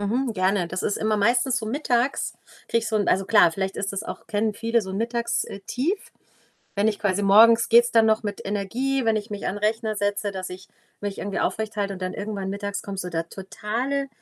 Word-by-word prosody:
Mhm, 235 +5 0
gerne. 185 -2 +1
Das 185 +2 -4
ist 205 - 0
immer 215 0 0
meistens 245 +4 +2
so 220 - -5
mittags 250 +1 0 0.4
kriege 230 - +2
ich 225 -1 -3
so 220 - 0
'n 205 - +1
also 190 +1 +2
klar, 185 -5 +6
vielleicht 190 +2 -3
ist 195 0 -2
das 200 +1 -3
auch - - -8
kennen 215 0 0
viele 230 +2 +1
so 190 -3 -7
'n 190 - -4
Mittags 235 +1 -1
äh, 200 - -8
Tief. 345 +11 -2 0.6
Wenn 205 +2 +2
ich 210 -2 -1
quasi 205 -1 0
morgens 225 +4 +6
geht's 235 +1 +6
dann 225 -1 +5
noch 220 0 +3
mit 205 -2 -4
Energie, 240 +7 -1
wenn 225 -1 +3
ich 210 -1 -3
mich 205 -1 -5
an 205 - -2
Rechner 215 +1 0
setze, 205 0 -1
dass 185 -1 -5
ich 185 +1 -10 0.3
mich 205 -1 -4
irgendwie 200 -1 -3
aufrechthalte 210 -2 -1
und 190 - -8
dann 185 0 -3
irgendwann 205 -2 -4
mittags 200 +1 -4
kommt 200 -1 -6
so 180 -1 -3
der 165 0 -3
totale 235 +9 -3
210 Hz, 225 wpm, -24 LUFS, 195-230 Hz, 0.6 s, klar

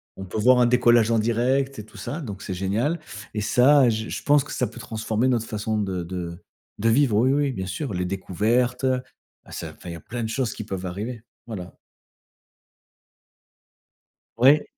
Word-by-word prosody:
On 95 - -7
peut 95 - -5
voir 125 +4 +5
un 120 - +5
décollage 120 -2 +4
en 115 - +3
direct 130 +4 +1
et 105 - -7
tout 110 - -16
ça, 155 - -5
donc 100 -8 -7
c'est 95 - -4
génial 105 - 0 0.3
et 105 - -2
ça, 125 +4 +5
j 110 0 -2
je - - -4
pense 145 -1 +4
que - - -10
ça - - 0
peut - - -11
transformer 110 +1 -1
notre 120 -3 +1
façon 110 0 -2
de 95 -3 -2
de 85 -1 -5 0.4
de 115 +3 +2
vivre. 120 -2 +3
Oui, 125 +4 +4
oui, 145 -1 +1
bien 95 -6 -4
sûr, 100 +6 -4
les 90 0 -1
découvertes. 110 +7 0 0.6
Ça - - -6
enfin 90 - -10
il - - -5
y - - -6
a 85 - -8
plein 120 +6 -5
de 110 - -2
choses 120 -1 -1
qui - - -6
peuvent 95 -3 -5
arriver. 105 +6 -5 0.2
Voilà. 95 -6 -7 2.6
Ouais. 140 +5 +6
115 Hz, 190 wpm, -24 LUFS, 100-125 Hz, 2.6 s, Ouais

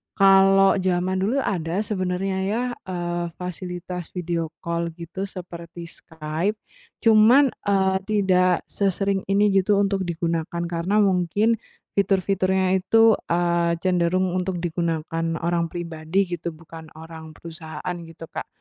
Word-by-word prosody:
kalau 195 0 +5
zaman 185 0 0
dulu 240 +8 0
ada 175 +2 -1
sebenarnya 190 -1 -2
ya, 225 +5 0 0.2
eee, 175 -1 -2
fasilitas 180 -1 -6
video 170 -2 -2 0.2
call 170 0 -1
gitu 180 +3 -6
seperti 170 -2 -9
Skype. 160 +6 -3 0.5
Cuman, 230 +5 +6 0.2
eee, 190 -1 +3
tidak 185 -4 +2
sesering 195 0 -1
ini, 200 +1 +3
gitu, 195 +1 +3
untuk 195 -2 +1
digunakan 170 0 -2
karena 190 +5 +2
mungkin 200 +4 +2 0.4
fitur-fiturnya 190 -1 +2
itu, 225 +3 +5 0.2
eee, 170 0 +1
cenderung 180 0 +1
untuk 185 0 -2
digunakan 165 -1 -2 0.2
orang 170 -1 +1
pribadi 170 +2 -2
gitu, 170 -1 -4
bukan 160 0 -12
orang 160 -1 -11
perusahaan, 165 +1 -7
gitu, 165 0 -12
Kak. - - -5
180 Hz, 120 wpm, -23 LUFS, 170-195 Hz, 0.5 s, Cuman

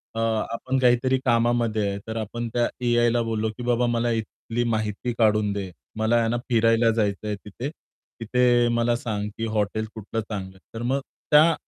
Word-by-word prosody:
अ, - - -2
आपण 115 +3 -1
काहीतरी 130 +1 +3
कामामध्ये 115 -3 +2
आहे 100 - -3
तर 110 0 -4
आपण 115 +2 -3
त्या 120 -1 +2 0.2
एआयला 120 0 +3
बोललो, 110 -1 -1
की 125 - -6
बाबा 120 0 +2
मला 120 0 +1
इथली 115 +1 -3
माहिती 110 +1 -1
काढून 105 -2 +3
दे. 100 -2 -4 0.3
मला 110 +2 +2
आहे 115 -1 +3
ना 120 - 0
फिरायला 115 0 +4
जायचंय 105 -1 -1
तिथे 120 +7 -5
तिथे 120 -4 0
मला 120 0 +2
सांग, 105 -3 -3
की 115 - -2
हॉटेल 110 0 -1
कुठलं 110 +1 -4
चांगलं 95 -3 -6
आहे. - - -18 0.2
तर - - -4
मग 135 +3 +1 0.3
त्या 155 +3 +7
115 Hz, 175 wpm, -25 LUFS, 110-120 Hz, 0.3 s, त्या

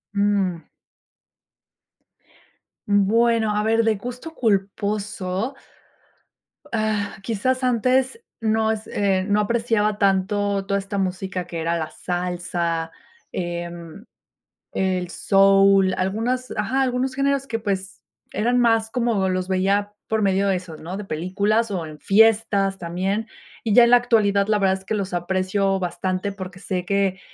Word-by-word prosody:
Mm. 200 -4 +1 2.2
Bueno, 220 +2 +2
a 210 - +1
ver, 225 +1 +2
de 220 - +3
gusto 250 +10 -7
culposo. 205 +1 -1 1.2
Ah, 215 -2 -1
quizás 255 +5 -1
antes, 255 - +1 0.2
no 220 -1 +1
es 220 0 -4
eh, 190 -2 0
no 205 0 +2
apreciaba 220 -1 +1
tanto 200 0 +1
toda 200 0 0
esta 200 +1 -5
música 185 -1 -2
que 170 - -6
era 170 +1 0
la 160 -1 -3
salsa, 175 -2 -3 0.4
em, 175 +2 -6 0.7
el 185 -2 -1
soul, 195 -1 +4
algunos, 230 +7 -1
ajá, 255 +6 0
algunos 255 0 -1
géneros 275 0 0
que, 225 -4 -2
pues, 195 -3 -4 0.3
eran 240 +4 +1
más 225 -2 +2
como 230 -5 0
los 185 0 -1
veía 200 +2 +1 0.2
por 220 0 +1
medio 195 0 +2
de 190 - +2
eso, 175 -3 -8
¿no?, 170 +5 -7
de 205 - -5
películas 200 +7 0
o 180 -4 -2
en 155 -1 -10
fiestas 205 -2 +3
también, 190 +6 -2 0.4
y 220 -3 +1
ya 240 - +8
en 235 - +3
la 245 - +8
actualidad, 205 -5 +2
la 210 -1 +3
verdad 190 -1 +2
es 190 - -17
que 215 - -2
los 195 -3 -3
aprecio 190 +2 0
bastante, 185 +2 -2
porque, 185 -2 -8
sé 180 -1 -3
que, 195 -1 0
200 Hz, 140 wpm, -22 LUFS, 185-220 Hz, 2.2 s, ya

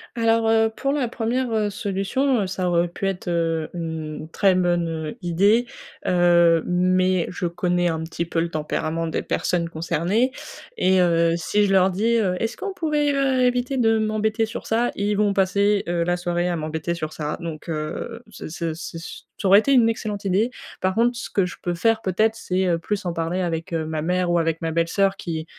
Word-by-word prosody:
Alors, 230 -1 +2
heu, 225 0 +3
pour 275 - -1
la 280 -3 0
1re, 240 +1 -2
heu, 215 -2 +1
solution, 205 +4 0
ça 185 0 -2
aurait 175 0 +2
pu 175 +3 -5
être, 190 -2 -4
heu, 165 -2 0
u - - -7
une 160 -2 -5
très 195 +1 +3
bonne, 175 -2 +1
heu, 160 -2 -5
idée, 200 +8 +3 0.4
heu, 170 -2 +4
mais 185 0 +2
je 180 - -4
connais 175 0 0
un 160 -1 -2
petit 165 +1 -4
peu 165 0 -2
le 170 +1 0
tempérament 155 +1 -2
des 160 - -2
personnes 170 -2 -1
concernées 170 - 0 0.5
et 185 0 +3
heu, 170 -1 +3
si 205 +5 +1
je 195 - 0
leur 190 0 +4
dis, 220 +6 +1
heu: 190 -5 +1
«Est-ce 225 +1 -2
qu'on 400 -1 -4
pourrait, 300 -5 0
heu, 270 -2 +2
éviter 250 +2 0
de 225 -2 +3
m'embêter 215 +1 0
sur 220 - -7
ça?», 235 +2 +1
ils 205 +1 0
vont 205 -1 +2
passer, 200 +1 +2
heu, 170 0 0
la 175 +1 0
soirée 175 0 -1
à 175 - 0
m'embêter 160 +1 -3
sur 155 -2 -5
ça 150 -1 -4
donc 165 -2 -7
heu, 165 +9 -4
c'est - - -8
c'est 165 0 -3
c'est 165 +1 -7
su 165 - -9 0.2
ça 195 - 0
aurait 195 +2 +8
été 275 - 0
une 245 -4 +5
excellente 210 -3 -3
idée. 200 +6 +1 0.3
Par 185 0 0
contre 240 +2 +2
ce 240 - -6
que 195 - +1
je 180 - -6
peux 175 - -2
faire, 225 +5 +1
peut-être, 215 +4 +1
c'est, 190 -4 -1
heu, 170 -2 +2
plus 200 +4 -3
en 175 - -1
parler 165 +2 -2
avec, 165 -2 -3
heu, 160 -1 -1
ma 155 0 -3
mère 180 +2 0
ou 175 - +3
avec 165 -1 0
ma 165 -1 -1
belle-sœur 180 +4 +1
qui, 160 -4 -5
185 Hz, 210 wpm, -23 LUFS, 170-220 Hz, 0.5 s, aurait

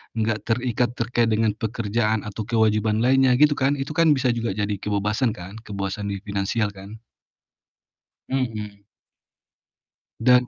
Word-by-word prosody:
nggak 110 -1 -1
terikat 120 0 0
terkait 120 0 +1
dengan 110 0 +2
pekerjaan 110 -1 -1
atau 105 +1 -5
kewajiban 110 -1 +2
lainnya 130 0 +4
gitu 150 +2 +5
kan, 135 +2 +2
itu 135 +1 -4
kan 165 0 +3
bisa 130 -2 +1
juga 115 -4 -2
jadi 105 -1 -2
kebebasan 105 +3 0
kan? 95 +5 -9
Kebebasan 100 0 -4
di 100 0 -5
finansial 100 +1 -1
kan? 100 +3 -11 1.3
Mhm. 110 -6 -3 1.4
Dan 125 +1 +5
110 Hz, 130 wpm, -23 LUFS, 105-125 Hz, 1.4 s, gitu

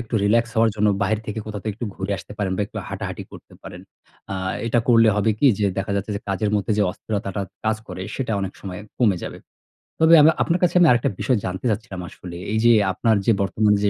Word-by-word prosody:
একটু 120 0 -6
রিলাক্স 115 +3 +2
হওয়ার 115 0 +4
জন্য 105 0 +3
বাহির 105 +2 +1
থেকে 105 +1 -4
কোথাও 105 -2 -5
থেকে 110 -2 -3
একটু 120 0 -4
ঘুরে 95 +1 -3
আসতে - - -10
পারেন 100 -3 -1
বা - - -2
একটু - - -13
হাঁটাহাঁটি - - -5
করতে - - -13
পারেন। - - -9 0.5
আ - - -2 0.3
এটা 120 +1 +2
করলে 115 -2 +6
হবে 110 +2 +2
কি 145 - +4
যে, 105 - +2
দেখা 95 +1 -2
যাচ্ছে 100 +2 -3
যে - - -6
কাজের 100 +2 0
মধ্যে 105 +2 -1
যে - - +4
অস্থিরতাটা 100 0 -4 0.2
কাজ 110 0 +1
করে, 90 0 -6
সেটা 125 -4 -2
অনেক 95 -1 -3
সময় 95 0 -7 0.2
কমে 105 -7 +3
যাবে। - - -6 0.6
তবে 160 +1 +6
আব 150 - +7 0.2
আপনার 170 +1 0
কাছে 180 - +2
আমি 170 - +6
আরেকটা 120 -1 +2
বিষয় 125 -4 +1
জানতে 95 +5 -4
চাচ্ছিলাম 105 -3 -3
আসলে 85 -1 -10 0.2
এই 110 - +1
যে 120 - +7 0.2
আপনার 110 +3 +2
যে 115 - +4
বর্তমানে 105 +1 +2
যে - - +4
105 Hz, 230 wpm, -22 LUFS, 100-115 Hz, 0.6 s, আব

